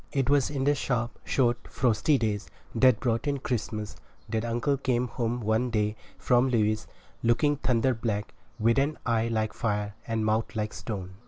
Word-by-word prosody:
It 135 -1 +1
was 145 -3 +3
in 140 -2 -2
the 145 +2 +4
sharp, 125 -4 -2
short, 120 -3 +1
frosty 125 +4 +2
days 105 -3 -2 0.2
that 120 -1 +5
brought 120 +2 0
in 140 -1 +1
Christmas 110 -5 -3 0.3
that 110 +1 -1
uncle 120 +4 0
came 125 -2 0
home 120 0 -2
one 110 +3 +1
day 105 -2 0 0.2
from 125 +1 +3
Lewes, 110 -3 +1 0.3
looking 145 +5 +2
thunder 125 -1 +2
black, 110 -3 -3 0.2
with 115 +2 +3
an 145 +3 0
eye 115 -1 +1
like 110 -2 -1
fire 105 -2 -1
and 115 -1 -1
a - - 0
mouth 110 +1 0
like 110 0 -2
stone. 95 -5 -5
115 Hz, 175 wpm, -28 LUFS, 110-130 Hz, 0.3 s, that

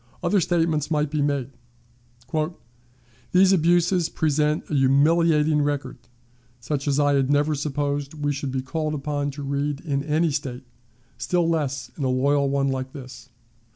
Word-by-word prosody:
Other 185 +2 +2
statements 165 -3 0
might 150 -2 0
be 150 -1 0
made. 140 -3 -1 1.8
"These 190 +1 +6
abuses 175 0 +2
present 150 0 0
a - - -6
humiliating 150 +3 +3
record, 145 -3 -2 0.6
such 140 +4 -3
as 140 0 +2
I 145 -1 +3
had 135 -1 +2
never 145 +2 +2
supposed 145 0 -2
we 145 -1 -1
should 140 -1 -4
be 130 0 -2
called 155 +3 -2
upon 145 0 -2
to 145 +1 -7
read 140 +1 -2
in 140 -4 -2
any 155 +2 +1
State, 135 -3 -4 0.5
still 175 -2 +1
less 145 -4 -2
in 145 - -5
a 130 - +1
loyal 140 +2 +2
one 140 0 +1
like 130 0 -3
this. 130 -3 -10
145 Hz, 155 wpm, -24 LUFS, 140-155 Hz, 1.8 s, These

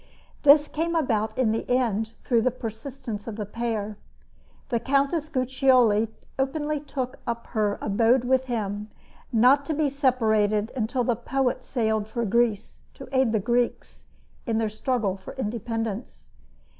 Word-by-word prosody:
This 295 +1 +7
came 335 +3 -2
about 220 -8 0
in 250 -4 +2
the 225 - -1
end 225 -3 0
through 235 -3 +2
the 255 - +3
persistence 230 -1 -6
of 225 - -4
the 210 -1 -4
pair. 215 -1 -3 0.7
The 235 -3 +1
Countess 280 +5 +1
Guiccioli 255 -5 +3 0.3
openly 295 +2 -1
took 265 -3 -5
up 235 0 -3
her 210 -2 +1
abode 230 +4 +3
with 260 +1 +2
him, 210 -4 -3 0.4
not 250 +5 +5
to 315 - -1
be 300 -1 +1
separated 220 -6 +1
until 245 +1 0
the 240 0 +1
poet 255 +2 -1
sailed 220 -4 -1
for 235 +1 -2
Greece 220 0 0
to 270 - -10
aid 260 -3 +3
the 220 - +2
Greeks 240 +3 -1 0.4
in 225 -1 +1
their 225 -1 +1
struggle 215 -3 -1
for 190 - -10
independence. 225 -2 -4
235 Hz, 145 wpm, -25 LUFS, 220-265 Hz, 0.7 s, This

